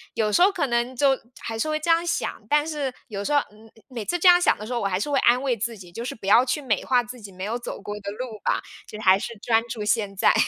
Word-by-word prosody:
有 215 -2 +1
时 350 - +3
候 385 +3 +6
可 335 -8 -1
能 240 +1 -1
就 275 +2 +4 0.3
还 225 0 -5
是 310 - 0
会 305 - 0
这 330 +2 +1
样 335 +1 +3
想， 330 - -2
但 295 0 +3
是 295 -4 -2 0.2
有 200 -2 -4
时 250 - -3
候 290 - +6
嗯， 215 +1 -18 0.2
每 235 -4 -5
次 350 - 0
这 360 - +3
样 355 0 +8
想 - - +3
的 210 - -8
时 245 - -5
候， 240 - 0
我 200 - 0
还 185 -1 -1
是 250 - -2
会 275 - +3
安 245 +2 +4
慰 260 -3 +1
自 230 +1 -3
己， 180 -3 -13
就 230 +6 -6
是 - - -4
不 220 - -12
要 225 +5 +6
去 265 +3 -1
美 245 -7 0
化 250 -2 +3
自 245 0 -10
己 200 -2 -10
没 185 0 -8
有 225 +4 -2
走 240 - -6
过 205 - -6
的 200 - -5
路 220 0 -7
吧， - - +1 0.3
就 215 - -9
还 190 -2 +5
是 230 +1 -6
专 225 +1 +2
注 225 -2 -5
现 205 -2 0
在。 190 - +4
235 Hz, 325 characters per minute, -24 LUFS, 210-275 Hz, 0.3 s, 样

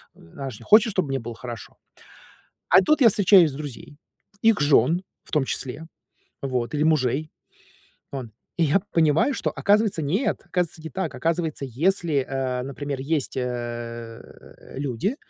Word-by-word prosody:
она 135 +12 -8
ж, 105 - -11
э, - - -11
хочет, 220 +1 +5
чтоб 185 -5 0
мне 135 0 -1
было 120 0 -7
хорошо. 120 -2 -8 1.0
А - - +8
тут 305 +11 +2
я 245 - +8
встречаюсь 190 -5 +5
с - - -9
друзей, 145 0 -8 0.5
их 225 -5 +4
жен, 145 +4 +3 0.2
в - - -17
том 150 -3 +2
числе, 135 +4 -5 0.6
вот, 125 -3 -2
или 150 - +1
мужей, 155 -1 +1 0.8
ан 125 -5 -6 0.3
И 170 - +4
я 170 +6 +3
понимаю, 160 - +3
что, - - -2
оказывается, 205 -3 +2
нет. 185 - 0
Оказывается, 175 -3 -2
не 160 - -6
так. 190 - -3
Оказывается, 165 -3 -1
если, 155 - 0
э, 130 -2 -2
например, 140 +1 -5
есть, 140 -1 -2
э, 120 -2 -5 0.6
люди, 140 - -2
145 Hz, 155 wpm, -24 LUFS, 125-175 Hz, 1.0 s, А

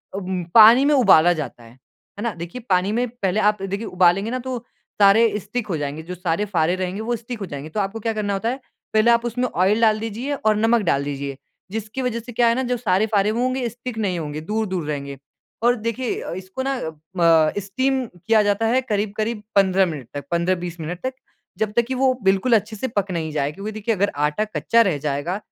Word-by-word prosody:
अम, 185 -2 -3
पानी 230 +4 +9
में 295 - +4
उबाला 175 - +6
जाता 150 -7 -6
है। 115 - -15
है 130 - -17
ना, 235 -2 -1
देखिए 170 +8 -7
पानी 185 +1 +2
में 240 +3 0
पहले 210 -4 -1
आप 210 -1 +2
देखिए 200 +3 -3
उबालेंगे 185 +4 +2
ना 255 - -2
तो 255 0 -4 0.4
सारे 210 +1 +5
स्टिक 215 +3 -4
हो 175 -6 -2
जाएँगे। 145 +2 -4
जो 180 +2 -7
सारे 180 +2 -1
फारे 175 -3 +1
रहेंगे 185 +2 -3
वो 240 +2 -1
स्टिक 230 +1 -7
हो 200 - -4
जाएँगे। 145 -2 -7
तो 185 - -3
आपको 200 +2 -2
क्या 225 +1 -1
करना 210 -2 -2
होता 200 +4 -1
है 260 +3 -3 0.3
पहले 220 +2 +5
आप 235 0 +2
उसमें 245 +2 -1
ऑयल 200 +5 +2
डाल 215 -1 +4
दीजिए 225 +6 -4
और 215 -5 +1
नमक 225 +1 +3
डाल 140 - +1
दीजिए। 140 -1 -4 0.3
जिसकी 220 +4 -4
वजह 250 -2 -1
से 240 +2 -10
क्या 235 +1 +2
है 230 - +3
ना 260 - -1
जो 250 -1 -1
सारे 210 -3 +1
फारे 205 -1 +2
होंगे 250 +3 0
स्टिक 235 +1 -7
नहीं 190 -5 -1
होंगे, 150 -1 -5
दूर-दूर 190 -2 -2
रहेंगे। 140 -2 -4 0.5
और 240 +1 +4
देखिए 230 +2 -3
अ, - - -5
इसको 185 +7 -6
ना 270 0 -1 0.4
म 165 -2 +5
स्टीम 260 +7 -1
किया 220 +5 +2
जाता 205 +2 +1
है 255 +3 +2
करीब-करीब 215 -1 -2
15 190 -1 +4
मिनट 150 -8 -6
तक, 145 -1 -6
15-20 175 0 -1
मिनट 170 +3 -5
तक 260 0 -2 0.4
जब 215 0 -1
तक 235 - +4
कि 260 - -2
वो 260 0 +3
बिल्कुल 195 +6 +3
अच्छे 215 0 -1
से 240 +5 -3
पक 205 -5 -2
नहीं 160 -3 -3
जाए। 145 -1 -1
क्योंकि 200 +7 -6
देखिए 215 +1 -1
अगर 200 +1 +1
आटा 150 +8 0
कच्चा 230 +2 +2
रह 185 -9 +2
जाएगा 145 +6 -2
205 Hz, 220 wpm, -22 LUFS, 175-230 Hz, 0.5 s, पानी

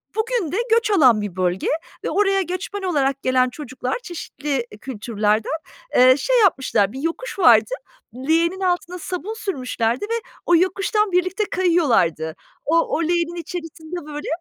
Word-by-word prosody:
bugün 440 -6 -1
de 370 - -1
göç 455 -1 +3
alan 255 - +5
bir 205 -4 -5
bölge 185 0 -1 0.4
ve - - -1
oraya 390 -1 +2
göçmen 370 +2 -4
olarak 275 -6 0
gelen 255 -1 +3
çocuklar 255 - -4
çeşitli, 300 -4 -5 0.2
iii, 210 - -11
kültürlerden, 215 -3 -1 0.4
eee, 255 +1 +7
şey - - +2
yapmışlar, 265 - +2
bir 265 - -7
yokuş 335 +8 -4
vardı, 445 - +6 0.6
leğenin 335 +4 +2
altına 360 -1 -1
sabun 370 +5 -4
sürmüşlerdi 255 - -2
ve 460 +1 -2 0.2
o 345 - +4
yokuştan 390 +4 +1
birlikte 370 +4 +1
kayıyorlardı. 230 - +2 0.3
O 320 - +1 0.2
o - - -1
leğenin 340 +1 0
içerisinde 330 -1 -7
böyle 295 -1 -6
330 Hz, 145 wpm, -21 LUFS, 255-380 Hz, 0.6 s, eee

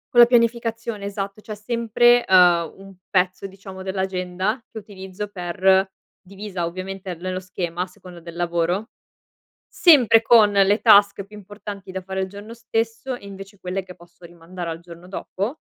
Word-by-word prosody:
Con 240 - +9
la 235 - +4
pianificazione, 230 -2 0
esatto. 200 +1 -5
C'è 215 0 -7
sempre, 235 +2 +3
uhm, 175 -3 +4
un 195 0 -14
pezzo, 185 +1 0
diciamo, 190 -1 -11
dell'agenda, 190 +3 -2
che - - -10
utilizzo 200 -1 -8
per 190 0 +1 0.3
divisa 195 -2 -5
ovviamente 185 +2 -6
l - - -19
nello 185 +1 -4
schema 175 -2 -4
a - - 0
seconda 180 -2 -14
del 170 0 -10
lavoro, 175 +5 -1 0.8
sempre 260 - +5
con 225 -2 +5
le 200 +1 +3
task 200 -3 +5
più 210 +2 -15
importanti 205 -1 -9
da 190 0 -5
fare 190 +1 -4
il 190 - -3
giorno 205 +3 -10
stesso 230 +2 -3
e 225 - -13
invece 195 +1 -11
quelle 185 +1 -3
che 185 -1 -13
posso 175 0 -18
rimandare 170 +1 -8
al 165 0 -5
giorno 170 +1 -13
dopo, 200 +7 -5
195 Hz, 165 wpm, -22 LUFS, 180-215 Hz, 0.8 s, Con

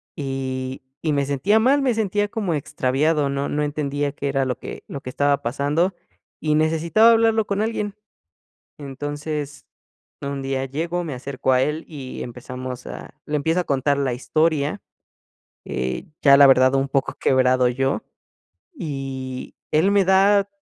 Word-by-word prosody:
Y, 130 -2 -4 0.2
y 155 - 0
me 140 -1 +1
sentía 160 +11 +2
mal, 275 +5 +4
me 255 -3 +2
sentía 205 -1 0
como 205 -6 -2
extraviado, 145 +1 0
no 140 0 -2
no 150 - -1
entendía 145 -1 -2
qué 140 - -3
era 135 -1 +1
lo 125 -2 -2
que - - -8
lo 140 - -6
que 125 - -7
estaba 140 +2 +1
pasando, 145 +9 0 0.5
y 155 -1 +1
necesitaba 165 +8 +4
hablarlo 225 -1 +3
con 200 0 -1
alguien. 210 -2 -2 0.8
Entonces, 145 +1 -5 0.6
un 140 0 -4
día 135 0 -2
llego, 165 +6 -2
me 155 - -4
acerco 130 +1 -2
a 125 - +3
él, 150 +4 -1
y 135 -5 -7
empezamos 125 +1 -7
a - - -8
le 150 - -2
empiezo 160 +5 +1
a - - -4
contar 140 +1 +1
la 135 -3 0
historia, 155 +6 0 0.8
eh, 65 0 -3 0.2
ya 140 -1 +7
la 140 - +9
verdad 130 0 +5
un 135 0 +1
poco 135 0 0
quebrado 130 -1 +3
yo, 135 +3 -1 0.7
y 135 - -5 0.2
él 160 +6 +4
me 200 -1 +4
da 195 +2 +4
145 Hz, 155 wpm, -22 LUFS, 135-170 Hz, 0.8 s, la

